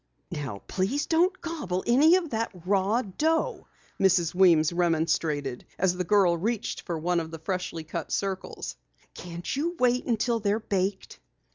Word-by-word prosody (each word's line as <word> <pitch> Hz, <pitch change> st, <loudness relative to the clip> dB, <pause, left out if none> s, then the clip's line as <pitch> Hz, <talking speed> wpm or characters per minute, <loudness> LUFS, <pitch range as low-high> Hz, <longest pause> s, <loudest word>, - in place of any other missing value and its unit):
"Now 130 Hz, -9 st, -5 dB
please 210 Hz, +11 st, -1 dB
don't 355 Hz, +3 st, +2 dB
gobble 295 Hz, -, -3 dB
any 290 Hz, +8 st, +6 dB
of 350 Hz, -5 st, -1 dB
that 225 Hz, 0 st, -1 dB, 0.2 s
raw 200 Hz, +5 st, +2 dB
dough!" 320 Hz, -, -1 dB, 0.3 s
Mrs. 185 Hz, -4 st, +3 dB
Weems 170 Hz, -4 st, +5 dB
remonstrated 160 Hz, -5 st, 0 dB
as 180 Hz, -1 st, +2 dB
the 180 Hz, -, -1 dB
girl 190 Hz, -2 st, +4 dB
reached 215 Hz, +6 st, -2 dB
for 170 Hz, -3 st, -4 dB
one 175 Hz, +2 st, +1 dB
of 160 Hz, -1 st, -5 dB
the 160 Hz, -, -7 dB
freshly 170 Hz, -1 st, -4 dB
cut 155 Hz, -, -5 dB
circles. 195 Hz, -1 st, -3 dB, 0.4 s
"Can't 175 Hz, +4 st, -6 dB
you 335 Hz, +5 st, -1 dB
wait 250 Hz, -2 st, +2 dB
until 230 Hz, 0 st, +1 dB
they're 205 Hz, 0 st, +1 dB
baked?" 195 Hz, -2 st, -2 dB
190 Hz, 150 wpm, -27 LUFS, 170-240 Hz, 0.4 s, any